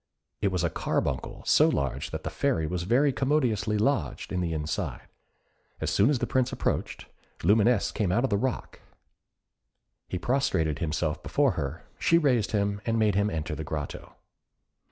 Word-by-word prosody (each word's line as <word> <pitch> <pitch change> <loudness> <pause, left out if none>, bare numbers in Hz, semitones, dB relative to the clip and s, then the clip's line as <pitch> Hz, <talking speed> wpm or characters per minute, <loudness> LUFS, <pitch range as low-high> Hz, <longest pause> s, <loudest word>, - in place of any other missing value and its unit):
It - - +2
was 90 -3 0
a 85 - +1
carbuncle, - - -2
so - - +5
large 70 -2 -2
that - - -5
the - - -4
Fairy 80 - 0
was 85 +2 -3
very 135 +4 +4
commodiously 125 -7 +1
lodged 135 +7 0
in 90 - 0
the 85 -2 -1
inside. 75 -2 -3 0.8
As - - -1
soon 105 +6 +4
as 145 - +2
the - - -1
Prince 130 -1 +1
approached, - - -2 0.4
Lumineuse 105 +4 +3
came 100 -5 -1
out 120 +7 +2
of 135 - 0
the - - +3
rock; 125 +5 -3 1.3
he - - -3
prostrated 80 - 0
himself 80 -1 -1
before 140 -3 +2
her, 75 -1 -4
she 165 - +4
raised 125 -9 +2
him, 100 -1 0
and 115 0 0
made 110 -2 +3
him 100 +2 +2
enter 80 -3 -3
the 75 +1 -4
grotto. 75 -1 -6
100 Hz, 170 wpm, -27 LUFS, 80-125 Hz, 1.3 s, so